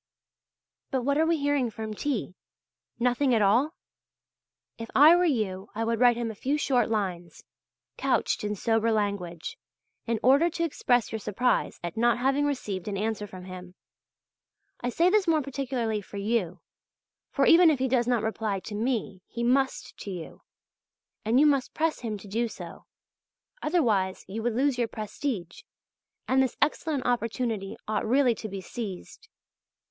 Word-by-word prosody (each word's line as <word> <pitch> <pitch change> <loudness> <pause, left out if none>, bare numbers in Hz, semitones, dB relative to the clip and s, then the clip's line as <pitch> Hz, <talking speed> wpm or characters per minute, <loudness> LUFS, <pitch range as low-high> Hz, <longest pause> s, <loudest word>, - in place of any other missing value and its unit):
But 260 -2 -1
what 280 +3 +1
are 320 - +3
we 335 0 +2
hearing 285 -4 +1
from 220 0 -6
T.? 235 -5 -2 0.6
Nothing 250 +2 +2
at 220 - +2
all? 250 - +3 1.0
If 230 - -6
I 305 +5 +8
were 355 +1 +3
you 210 - -1
I 225 - -1
would 230 0 0
write 245 -1 +5
him 235 -2 -2
a - - -8
few 270 +8 -1
short 250 -6 +1
lines, 185 -6 -3 0.5
couched - - 0
in 210 0 -1
sober 225 +2 +1
language, 200 -6 -2 0.5
in 230 -1 0
order 280 +7 +5
to 335 0 -3
express 245 -7 +1
your 220 - -3
surprise 235 +5 0
at 175 +5 -5
not 235 0 +3
having 270 +3 +1
received 210 -10 -3
an 200 -1 -2
answer 210 0 -2
from 185 -2 -10
him. 185 -1 -10 1.0
I 245 - -2
say 340 +8 +3
this 415 -3 +3
more 315 -3 +3
particularly 255 -5 -2
for 200 - -10
you; 200 -4 -1 0.7
for - - +1
even 340 0 +7
if 305 - +2
he 260 +1 0
does 245 -2 +1
not 240 -3 +1
reply 215 -2 -1
to 210 - -8
me, 215 -4 -2
he 235 - -4
must 265 +2 +1
to - - -7
you. 175 -4 -7 0.8
And 230 +4 +3
you 300 - +6
must 280 -3 +2
press 320 0 0
him 220 -3 -4
to 200 - -12
do 230 +4 0
so, - - -10 0.7
otherwise 220 - +1
you 210 +4 -5
would 235 0 -1
lose 265 0 +1
your 235 - +1
prestige, 215 - -5 0.7
and 265 +1 +3
this 260 -2 -1
excellent 300 -3 0
opportunity 230 -3 -1
ought 215 -1 0
really 255 +1 +4
to 220 -1 -7
be 195 -1 -6
seized.... 215 - -7
235 Hz, 165 wpm, -27 LUFS, 210-270 Hz, 1.0 s, I